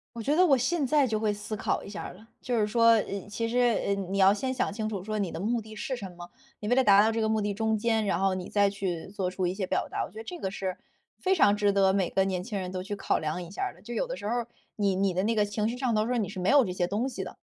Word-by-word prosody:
我 230 - -5
觉 285 +7 +1
得 365 +3 +5
我 280 -6 +5
现 295 +4 0
在 285 +1 +3
就 215 -2 -1
会 215 -2 +1
思 210 +1 -5
考 - - -1
一 - - -9
下 205 +1 -6
儿 - - -7
了。 215 +5 -16
就 245 -2 -1
是 210 - +2
说， 230 +2 +3
呃， 200 -2 -2
其 230 +3 -2
实， 245 +2 0 0.3
呃， 200 - +1
你 195 0 -3
要 195 +1 +6
先 260 +5 -2
想 255 -5 -1
清 215 +1 -3
楚 200 -4 -4
说 215 0 -2
你 190 - -1
的 - - -6
目 230 +6 0
的 215 0 -11
是 260 +5 -3
什 195 -5 -7
么， 175 0 -11 0.3
你 210 - -6
为 245 - +3
了 265 - +4
达 200 -3 +6
到 220 +2 +3
这 225 - -1
个 220 - +1
目 220 0 +1
的 205 -1 -1
中 220 +1 0
间， 225 0 +1
然 195 - +1
后 195 -1 +2
你 185 -1 -5
再 200 -1 +3
去 190 -4 -3
做 190 -2 -2
出 185 0 -2
一 180 - -1
些 190 -1 -3
表 - - 0
达， - - -2
我 - - -9
觉 215 - -12
得 225 - -7
这 355 - -7
个 190 - -2
是 190 -1 -4 0.4
非 380 - +1
常 205 - +4
值 205 -1 +2
得 195 -1 +4
每 190 -3 0
个 190 - +2
年 185 -2 -2
轻 205 0 -4
人 185 0 -4
都 185 -1 -3
去 205 +1 -5
考 - - 0
量 155 +3 -2
一 175 -1 -8
下 - - -5
儿 - - -1
的， - - -20
就 240 +3 -7
有 - - 0
的 - - -4
时 - - -5
候， 240 +1 -1 0.3
你 200 -3 +1
你 195 -1 +1
的 185 - +1
那 225 +2 +1
个 210 - +4
情 210 +1 -1
绪 240 - -3
上 250 -3 0
头 215 - +2
说 250 -1 0
你 210 - -1
是 200 -2 -6
没 180 - +2
有 280 -2 +6
这 185 - -3
些 175 -1 -1
东 220 +7 -1
西 - - -5
的。 - - -8
210 Hz, 355 characters per minute, -28 LUFS, 195-230 Hz, 0.4 s, 要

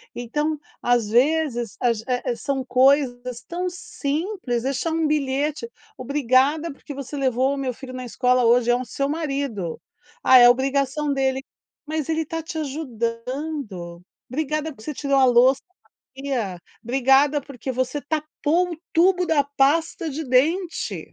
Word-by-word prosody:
Então, 295 +6 -2 0.2
às 240 -3 +2
vezes, 245 -2 +1
age 230 -3 +1
a 250 -1 -1
as 235 - -6
são 275 -2 -1
coisas 250 -1 +2
tão 360 +1 -2
simples, 345 - -3
deixar 275 +5 -1
um 325 -1 +1
bilhete: 295 - -1 0.3
"Obrigada 280 +4 +2
porque 285 +1 -10
você 275 +1 -7
levou 260 0 +1
o - - -4
meu 260 -2 -2
filho 255 +1 -10
na 255 0 -5
escola 250 +1 +2
hoje", 240 +1 +4
é - - +4
o 250 - -2
seu 275 +2 -2
marido. 275 - -3 0.4
"Ah, 260 - +8
é 245 0 +9
obrigação 275 +3 +1
dele", 265 -1 0 0.4
mas 310 -1 -3
ele 320 0 +1
está 325 +1 -4
te 320 0 -7
ajudando. 240 - -4 0.3
"Obrigada 305 +3 -2
porque 220 -5 -14
você 300 - -3
tirou 275 0 0
a 260 - +6
louça 255 +2 +5
da 370 - -41 0.4
pia. 245 -10 -3 0.2
Obrigada 270 +4 +3
porque 265 -2 -7
você 255 +3 -2
tapou 315 +3 -1
o 320 - -7
tubo 360 +2 +4
da 290 -3 +3
pasta 305 +4 +1
de 310 +3 -4
dente". 320 +8 +1
275 Hz, 155 wpm, -23 LUFS, 250-305 Hz, 0.4 s, é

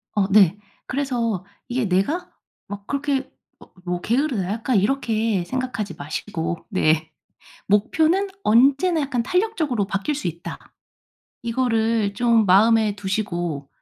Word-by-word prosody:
어 200 -2 +2
네. 195 -2 +5 0.3
그래서 240 -8 -1 0.2
이게 250 -1 -1
'내가 200 - 0 0.4
막 200 0 -8
그렇게 280 -1 -1 0.3
막 - - -18
뭐 175 0 -2
게으르다.' 240 -6 0
약간 230 +2 0
이렇게 220 -3 +1
생각하지 250 -6 -3
마시고. 165 +3 -4
네. 160 -5 +1 0.6
'목표는 315 - +2 0.2
언제나 275 +9 +4
약간 265 -4 -1
탄력적으로 325 - 0
바뀔 200 +9 -2
수 280 -10 -2
있다.' 170 +1 -9 0.7
이거를 225 -3 0
좀 230 0 +3
마음에 215 +2 +4
두시고 175 -8 -3
225 Hz, 260 characters per minute, -22 LUFS, 195-265 Hz, 0.7 s, 네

